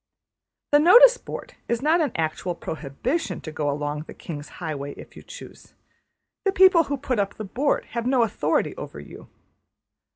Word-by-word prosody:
The 290 - +6
notice 475 +10 +8
board - - -8
is 235 - 0
not 325 +3 +3
an 295 -6 0
actual 165 +2 -2
prohibition 165 - -3
to 155 - -7
go 150 -1 -2
along 145 +1 -3
the - - -10
``King's 145 -3 -8
highway'' 145 -4 -5
if - - -13
you - - -11
choose. - - -13 0.7
The 390 - +2
people 370 -4 +6
who 285 0 -3
put 255 -4 -2
up 200 0 -1
the 215 - -6
board 270 +9 -1
have 235 0 -3
no 255 -2 +3
authority 225 -2 0
over - - -8
you. - - -12
230 Hz, 170 wpm, -24 LUFS, -, 0.7 s, notice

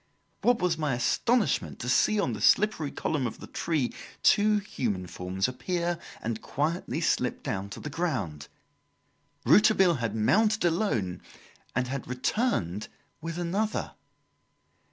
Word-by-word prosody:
What 245 -1 +4
was 165 -3 +1
my 150 -5 0
astonishment 210 - +1
to 120 - -6
see 210 +11 +3
on 135 - 0
the 105 - -6
slippery 200 - +3
column 140 -2 -1
of 110 - -7
the - - -8
tree 155 -7 -1 0.3
two 210 +1 +5
human 115 - -2
forms 90 +2 -2
appear 175 +6 -2 0.2
and 115 0 -3
quietly 155 +5 -2
slip - - 0
down 95 +1 -3
to - - -8
the - - -7
ground. 115 - -2 1.0
Rouletabille 190 -6 +5
had 115 -2 -2
mounted 215 - +3
alone, 120 - 0 0.5
and 125 0 +1
had 130 0 -4
returned 125 - -1 0.3
with 165 +1 -5
another. 195 +5 -1
150 Hz, 135 wpm, -28 LUFS, -, 1.0 s, two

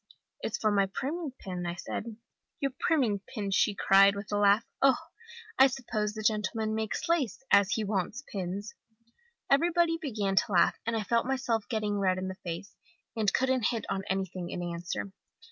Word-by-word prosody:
"'It's 225 - -2
for 215 - +1
my 200 -1 +3
priming 290 - -3
pin,' 180 -2 -5
said 210 - -4
I. - - -5 0.5
"'Your 275 -2 0
priming 245 -11 +2
pin!' 200 -1 -5
she 205 +1 +3
cried, 195 +1 +5
with 200 +1 -7
a - - +1
laugh. 205 +2 +4 0.2
'Oho! 275 +1 +5 0.6
I 265 - +9
suppose 220 -5 -3
the 215 - -5
gentleman 215 +1 0
makes 220 -1 -2
lace, 295 - 0
as 200 +1 +5
he 220 - 0
wants 210 +5 -2
pins!' 200 -1 -5 0.7
"Everybody 330 +3 +3
began 210 -9 -1
to 235 0 +3
laugh, 175 -2 +3
and 235 - +1
I 220 - -1
felt 235 +3 +1
myself 245 -5 -1
getting 210 -3 -1
red 185 -2 +2
in 185 0 -3
the 190 - -5
face, 175 +3 -6 0.4
and 215 -3 +2
couldn't 260 -3 +2
hit 230 -2 -2
on 195 -1 -1
anything 190 -2 -2
in 175 - -4
answer. 175 +3 -4
210 Hz, 180 wpm, -29 LUFS, 195-245 Hz, 0.7 s, I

